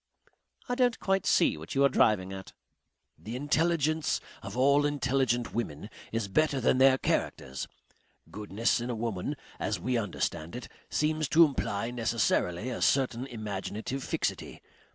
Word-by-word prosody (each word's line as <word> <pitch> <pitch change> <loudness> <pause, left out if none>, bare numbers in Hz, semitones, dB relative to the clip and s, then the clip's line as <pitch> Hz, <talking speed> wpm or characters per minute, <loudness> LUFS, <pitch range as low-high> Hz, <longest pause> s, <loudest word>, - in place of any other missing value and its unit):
"I 245 - -1
don't 245 -2 +2
quite 195 -1 0
see - - +4
what 80 - -8
you 135 - +4
are - - +7
driving 100 -7 +2
at." 95 -1 -9 0.7
"The 115 +3 -7
intelligence 155 +2 +1 0.2
of 100 +4 -7
all 140 +3 +4
intelligent 130 -4 0
women 95 -11 -4 0.2
is 115 -2 -1
better 145 +6 +2
than 130 +1 +2
their 135 0 +6
characters. 65 - -2 0.6
Goodness 105 +3 0
in 120 - -4
a 120 - -1
woman, 115 +3 -3 0.2
as 105 - -1
we 120 +6 0
understand 85 -5 -3
it, 125 - -6 0.2
seems 155 -1 0
to 165 +1 +7
imply 115 -6 -2
necessarily 115 -3 0
a 120 - -4
certain 130 -2 +2
imaginative 110 +3 -4
fixity. - - -3
120 Hz, 145 wpm, -29 LUFS, 105-140 Hz, 0.7 s, are